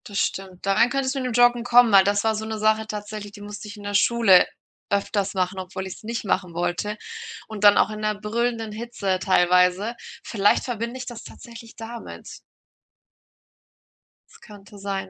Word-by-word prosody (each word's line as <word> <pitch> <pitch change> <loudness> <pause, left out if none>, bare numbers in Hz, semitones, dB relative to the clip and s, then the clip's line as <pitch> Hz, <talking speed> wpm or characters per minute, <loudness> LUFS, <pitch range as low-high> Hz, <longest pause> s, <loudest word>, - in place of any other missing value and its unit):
Das 205 - -6
stimmt. 190 -1 -3
Darein 205 +5 +3
könntest 265 +1 -1
du - - -1
mit 255 - -2
dem 250 - -3
Joggen 245 0 +4
kommen, 245 -1 +5
weil 195 -1 +7
das 205 +1 +1
war 220 0 +2
so 215 +1 -4
'ne 220 0 -4
Sache 215 0 +1
tatsächlich, 210 -1 -7
die 205 - -12
musste 210 +1 -8
ich 210 +1 -9
in 205 - -11
der 205 0 -4
Schule 200 -3 +5 0.4
öfters 200 0 -1
machen, 185 0 -1
obwohl 185 +1 -6
ich 190 - -6
es - - -17
nicht 230 +1 -4
machen 185 -3 -1
wollte, 175 +5 -2 0.5
und 215 -2 -7
dann 205 0 +7
auch - - +4
in 215 - -6
'ner 215 0 -1
brüllenden 225 +1 -2
Hitze 215 -4 -3
teilweise. 180 +4 +3 0.3
Vielleicht 205 -2 +2
verbinde 235 0 -4
ich 260 - -6
das 240 -2 -8
tatsächlich 230 -1 -12
damit. 230 +1 -9 1.9
Das - - -18
könnte 205 -1 -14
sein. 195 -1 -4
210 Hz, 185 wpm, -23 LUFS, 195-230 Hz, 1.9 s, weil